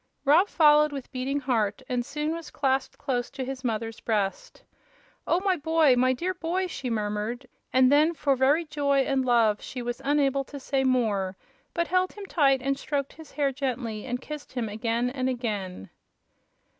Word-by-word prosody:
Rob 320 +8 +5
followed 300 -3 +5
with 275 -3 -7
beating 270 +2 -2
heart, 230 -3 0
and 250 -1 -1
soon 300 +4 -3
was 330 -1 -5
clasped 270 -1 -1
close 245 -4 -2
to 270 -2 -5
his 265 0 -6
mother's 225 -1 -3
breast. 215 - -2 0.6
"Oh, 340 - +3
my 385 -1 +2
boy 320 -3 +4
my 255 +1 +3
dear 350 +9 -1
boy!" 360 +2 -1
she 275 -8 -5
murmured, 215 +3 -2 0.3
and 255 0 +5
then 305 +4 +4
for 280 -3 +1
very 280 +6 +3
joy 280 -2 +1
and 270 0 +1
love 230 -4 +3
she 250 -2 -6
was 240 +2 -4
unable 275 -1 +2
to 285 - -9
say 270 0 0
more, 210 -7 +1 0.4
but 340 0 0
held 370 +1 +1
him 410 -1 -8
tight 275 -8 +2
and 275 0 0
stroked 280 -2 -2
his 320 -2 -14
hair 280 -1 +1
gently 250 -5 -3
and 245 0 -2
kissed 300 -1 -8
him 245 -3 -2
again 230 +3 -1
and 260 -1 -1
again. 205 - -4
265 Hz, 180 wpm, -27 LUFS, 240-295 Hz, 0.6 s, Rob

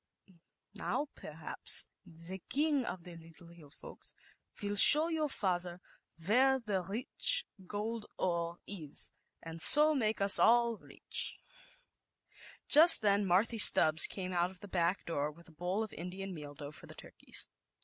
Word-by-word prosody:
Now, 290 0 -5
perhaps - - -1 0.2
the 170 +3 -8
King 290 -2 -1
of 180 -6 -8
the 175 -1 -13
< 165 - -15
Little 170 -3 -17
Folks' - - -10 0.4
will 205 0 -5
show 300 +10 +7
your 315 -2 -3
father 180 -6 -3 0.5
where 265 +6 +1 0.2
/ 180 +1 -10
rich 255 - -1 0.2
gold 215 +2 -7
ore 170 -1 -4
is, 160 -8 -5 0.3
and 165 0 -8
so 300 - +8
make 220 -6 -3
us 200 0 +5
all 235 -1 +1 1.9
Just 320 -4 +8
then 200 -1 0
Marthy 215 +6 -1
Stubbs 155 -5 +5
came 185 -2 -8
f 180 +1 -4
the 205 - -13
back 180 0 -3
door 150 -3 -4
with 170 +3 -19
a - - -18
bowl 180 +7 -4
of 220 - -10
ian 185 +2 -9
meal 145 -3 -11
dough 145 0 -11
for - - -15
the - - -13
turkeys. - - -7
190 Hz, 145 wpm, -30 LUFS, 170-230 Hz, 1.9 s, so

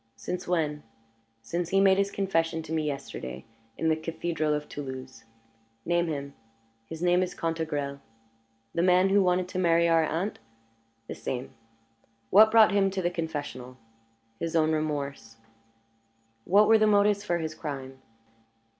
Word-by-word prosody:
"Since 175 +11 -5
when?" 155 -4 0 0.6
"Since 170 +8 -3
he 195 - +3
made 195 0 +5
his 200 0 +1
confession 165 -5 -1
to 160 0 -6
me 155 -1 0
yesterday 65 - -6 0.3
in 160 - -1
the 160 - +3
Cathedral 160 -1 -2
of 150 0 -5
Toulouse." 130 -3 -8 0.6
"Name 175 0 +1
him." 140 -3 -4 0.5
"His 160 +5 -7
name 180 0 +3
is 185 -1 -3
Cantegrel." 155 -4 -3 0.7
"The 170 - 0
man 185 +1 +4
who 200 +1 +4
wanted 180 -1 +1
to 185 - -3
marry 170 -1 +3
our 165 -1 +4
aunt?" 170 +6 -2 0.7
"The - - -5
same." 130 +1 -5 0.8
"What 215 +3 +8
brought 220 -1 +6
him 200 -1 +3
to 190 0 -3
the 175 - +1
confessional?" 145 -7 -5 0.6
"His 165 0 -3
own 160 -1 +3
remorse." 140 -7 -3 1.1
"What 205 +3 +5
were 225 0 +6
the 215 - +4
motives 205 0 +3
for 175 -4 0
his 160 -2 -4
crime?" 135 -4 -7
165 Hz, 150 wpm, -27 LUFS, 145-185 Hz, 1.1 s, What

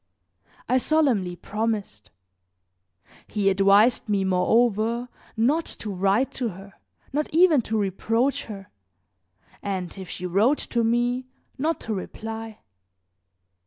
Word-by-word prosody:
I 255 - +3
solemnly 250 - +1
promised. 210 - -3 1.2
He 205 -2 +1
advised 200 +5 +4
me, 200 -2 +2
moreover, 225 +5 +2 0.3
not 285 +9 +2
to 215 - -5
write 195 +7 +1
to 245 -3 -2
her, 195 +1 -11 0.4
not 300 +1 -1
even 325 -4 +5
to 220 -1 -2
reproach 225 +7 0
her, 195 -3 -9 0.9
and 190 -3 -4
if 185 -2 -8
she 180 - -6
wrote 210 +11 +3
to 235 -1 -1
me 240 +2 +1 0.3
not 320 +4 0
to 220 - -3
reply. 220 +2 -6
220 Hz, 115 wpm, -25 LUFS, 195-245 Hz, 1.2 s, even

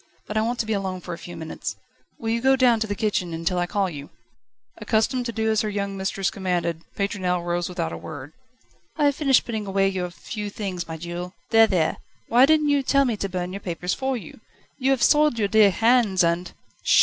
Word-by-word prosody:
But 210 - -6
I 215 - +3
want 235 +2 -1
to 230 - -1
be 220 - -1
alone 190 -2 -2
for 180 0 -7
a - - -6
few 175 -1 -9
moments 160 -1 -5 0.4
will 225 -1 -3
you 230 +1 0
go 265 +1 +5
down 250 -3 +4
to 220 - -1
the 205 - -2
kitchen 190 -6 -1
until 165 +2 -1
I 175 - 0
call 200 +1 0
you?" 145 -5 -8 0.7
Accustomed 240 +3 0
to - - -2
do 220 -1 0
as 220 - +2
her 215 - -2
young 200 -1 -3
mistress 195 0 -1
commanded, 175 -4 -2 0.2
Pétronelle 185 -3 -1
rose 175 0 -1
without 170 -3 -3
a - - -5
word. 145 -1 -9 0.6
"I 300 - +2
have 285 -1 +3
finished 275 -4 +3
putting 220 -3 -4
away 195 0 +2
your 185 -2 -3
few 210 +4 -6
things, 190 -5 -4
my 160 0 -5
jewel. 175 +2 -6 0.2
There, 225 -1 +7
there! 175 -6 +1 0.3
why 245 +3 +6
didn't 305 -1 +3
you 285 -1 +3
tell 275 +1 +3
me 240 -4 0
to 195 - -3
burn 180 0 -3
your 200 - -4
papers 180 -1 -3
for 265 -1 -1
you? 225 - -11 0.4
You 260 0 +1
have 270 -3 +2
soiled 300 -4 +4
your 210 -2 +1
dear 210 0 +6
hands, 225 -2 +3
and 170 +1 0
200 Hz, 225 wpm, -24 LUFS, 180-230 Hz, 0.7 s, There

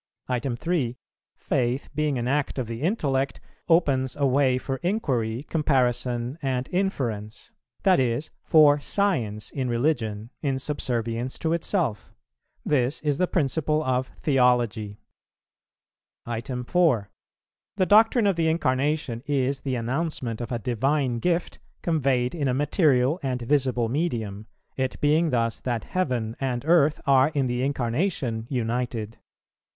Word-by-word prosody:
3. 130 -5 -1 0.4
Faith, 125 +1 -1
being 150 -3 0
an 120 0 -2
act 140 +2 0
of 130 - -1
the 115 +1 -6
intellect, 140 -7 0 0.3
opens 140 -6 +2
a 145 - +1
way 130 -1 +3
for 135 +1 -3
inquiry, 130 - -1
comparison 125 -3 0
and 130 -1 -1
inference, 120 - -2 0.3
that 185 -5 +5
is, 125 +3 -1
for 150 -2 +5
science 125 - -1
in 130 -3 -2
religion, 115 -4 -1
in 135 -3 0
subservience 125 -3 -2
to 160 0 -1
itself; 170 - -2 0.5
this 135 -1 +1
is 145 -2 0
the 180 - +3
principle 155 -1 0
of 130 -2 0 0.2
theology. 120 -7 +2 1.3
4. 125 - 0 0.7
The 190 -2 +2
doctrine 220 +3 +5
of 200 -2 +3
the 165 -1 +1
Incarnation 140 -5 0
is 135 -1 0
the 135 -2 -2
announcement 125 -1 -2
of 120 - -5
a 120 - 0
divine 125 +2 0
gift 175 +4 -1 0.2
conveyed 135 -6 +1
in 150 -5 -1
a 125 - +1
material 145 0 +2
and 125 -3 -2
visible 130 -3 +1
medium, 110 - -2 0.3
it 130 -1 -2
being 155 +3 +3
thus 115 -4 0
that 120 -3 -2
heaven 125 -11 -2
and 130 -1 -2
earth 155 -2 +4
are 135 0 +5
in 140 -2 +2
the 125 0 -1
Incarnation 125 - -1
united. 115 -3 -2
130 Hz, 130 wpm, -25 LUFS, 120-150 Hz, 1.3 s, that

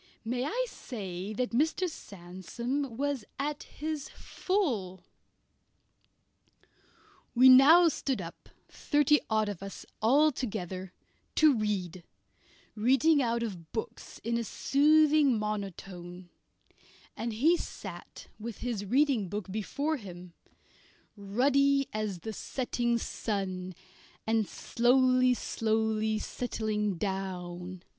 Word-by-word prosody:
May 245 +3 -1
I - - -1
say 195 - -6
that 250 +3 -2
Mr. 315 +9 +1
Sandsome 230 - -5
was 285 -3 -1
at 290 +1 -2
his 305 -1 -5
full? 230 - -2 2.3
We 255 +2 +7
now 300 +7 +8
stood 275 -6 -1
up, 170 -2 -9 0.2
thirty 295 0 +2
odd 215 -1 +2
of 205 -4 -5
us 195 -1 -8 0.2
altogether, 220 - +1 0.4
to 310 -2 +6
read, 190 -5 -2 0.7
reading 270 +7 +3
out 235 -1 0
of 180 -8 -6
books 220 - -6
in 235 +1 0
a - - -2
soothing 295 +1 +4
monotone, 185 -4 -6 0.8
and 230 +1 -3
he 300 +11 +4
sat - - -8
with 225 0 -6
his 235 -5 -2
reading 255 -3 +2
book 205 -1 -5
before 280 +9 -2
him, 180 -6 -10 0.8
ruddy 275 +7 +2
as 210 -5 -3
the 220 +5 -5
setting 240 0 -1
sun, 185 -5 -3 0.5
and 220 -2 +1
slowly, 255 +1 +3
slowly 220 -1 0
settling 215 -3 -2
down. 180 -1 -4
225 Hz, 105 wpm, -30 LUFS, 195-275 Hz, 2.3 s, now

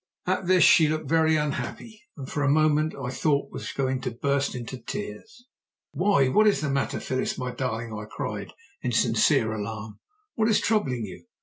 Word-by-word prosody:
At 185 0 -1
this 185 -2 +5
she 160 -3 +7
looked 155 -1 -2
very 160 +1 +3
unhappy, 155 +9 -3 0.2
and 135 -2 -7
for 145 - -3
a 140 - +2
moment 155 +1 +2
I 125 -2 -4
thought 140 +1 0
was - - -6
going 130 -1 -1
to 125 - -2
burst 140 +4 -1
into 125 +1 -6
tears. 220 - -7 0.5
"Why! 200 -10 +3
What 215 +11 +4
is 200 -9 +3
the 150 -2 -1
matter, 140 0 -1
Phyllis, 130 0 -2
my 125 -1 -3
darling?" 115 -3 -3
I 105 -1 -6
cried - - -5 0.3
in - - -2
sincere 110 -1 +3
alarm. 110 0 -6 0.3
"What 220 0 +1
is 220 - +4
troubling 135 - 0
you?" 95 -3 -11
140 Hz, 185 wpm, -26 LUFS, 125-160 Hz, 0.5 s, she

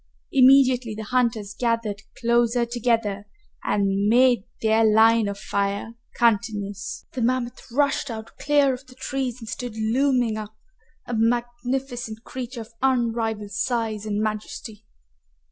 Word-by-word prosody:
Immediately 255 -3 +5
the 220 - -5
hunters 225 -3 0
gathered 230 -3 -1 0.2
closer 235 0 +2
together 230 -4 -1 0.4
and 200 0 +1
made 245 -3 +4 0.2
their 220 +1 +4
line 220 0 +5
of 200 0 -4
fire 200 +3 -2 0.2
continuous. 205 -3 0
The 255 - -4
mammoth 245 0 0
rushed 280 +1 +1
out 220 -1 -7
clear 285 -2 +3
of 255 +1 -9
the 255 - -15
trees 260 -2 -3
and 225 - -10
stood 240 0 -5
looming 240 0 +1
up, 215 0 -8 0.5
a 245 - -5
magnificent 240 0 -1
creature 250 -1 -6
of 225 +1 -12
unrivaled 230 -5 0
size 220 -1 -1
and 205 -1 -1
majesty. 215 0 -4
230 Hz, 130 wpm, -24 LUFS, 215-250 Hz, 0.5 s, Immediately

